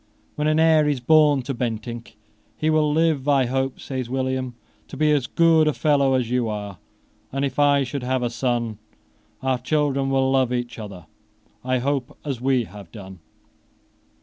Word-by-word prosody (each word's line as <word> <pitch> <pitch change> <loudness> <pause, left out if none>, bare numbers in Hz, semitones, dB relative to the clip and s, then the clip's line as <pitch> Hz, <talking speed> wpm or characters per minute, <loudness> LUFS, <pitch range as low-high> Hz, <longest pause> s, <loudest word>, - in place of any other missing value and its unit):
When 150 0 -1
an 155 +1 +2
heir 160 -2 +4
is 140 -3 0
born 145 +1 +4
to 135 - -3
Bentinck, 115 -1 -5 0.4
"he 155 +1 +1
will 155 -1 +2
live, 155 -3 +1
I 140 -3 +3
hope," 135 +1 -2
says 130 -3 -5
William, 130 -1 -2 0.3
"to - - -9
be 155 +1 +3
as 140 -5 +1
good 165 0 +4
a 150 - +2
fellow 140 -3 +2
as 125 -2 -1
you 125 -2 0
are; 105 -3 -6 0.5
and, 135 +1 -1
if 135 0 -4
I 145 -1 +4
should 135 +2 -4
have 130 0 -1
a 120 - -1
son, 120 -2 -2 0.6
our 130 -1 0
children 140 0 0
will 135 0 +2
love 130 -2 +2
each 120 -1 -3
other, 100 -6 -9 0.6
I 130 0 0
hope, 135 0 -2
as 135 -5 -4
we 130 -2 +2
have 100 -5 -12
done." 95 -3 -11
130 Hz, 175 wpm, -23 LUFS, 120-145 Hz, 0.6 s, heir